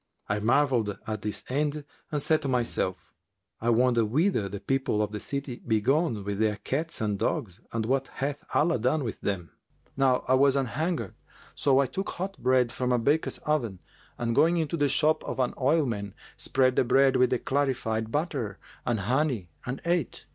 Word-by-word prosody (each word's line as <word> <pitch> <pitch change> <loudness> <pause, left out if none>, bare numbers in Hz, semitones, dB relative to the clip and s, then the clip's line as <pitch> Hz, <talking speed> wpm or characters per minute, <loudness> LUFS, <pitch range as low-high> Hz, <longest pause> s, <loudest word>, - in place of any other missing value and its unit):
I 100 +1 0
marvelled 120 -2 +2
at 110 -1 -4
this 105 0 -3
end 145 +2 -1 0.3
and 145 -2 -1
said 155 -1 +3
to 140 - -3
myself, 120 -7 -1 0.5
'I 115 - 0
wonder 120 0 +4
whither 125 - +1
the 100 +1 -5
people 135 -4 0
of 105 -1 0
the 105 - -4
city 140 +1 -4
be 110 -2 +3
gone 135 -2 +1
with 100 0 -3
their 110 -1 +2
cats 155 +9 -3
and 105 -2 -1
dogs 95 -5 -2
and 115 -1 -1
what 135 +3 0
hath 140 +1 -3
Allah 160 -2 +2
done 130 +6 +1
with 115 - -5
them?' 90 -4 -3 0.4
Now 135 -2 +2
I 130 - +3
was 135 +1 +5
anhungred 140 - -1 0.4
so 135 -2 +2
I 140 - +4
took 195 +9 -4
hot 195 +3 -4
bread 125 -1 +3
from 125 0 -1
a 125 - +4
baker's 145 +7 +1
oven 125 -11 0 0.4
and 115 -1 -1
going 165 +7 +4
into 160 0 -1
the 145 -3 +2
shop 155 +2 +3
of - - -4
an 125 -1 +1
oilman, 125 - 0 0.2
spread 130 -1 +1
the - - +5
bread 135 +2 +4
with 125 -1 +2
clarified 120 -5 0
butter 135 - -2 0.3
and 115 -4 +1
honey 125 - 0 0.2
and 125 +2 -4
ate. 170 -5 -1
130 Hz, 185 wpm, -27 LUFS, 110-145 Hz, 0.5 s, was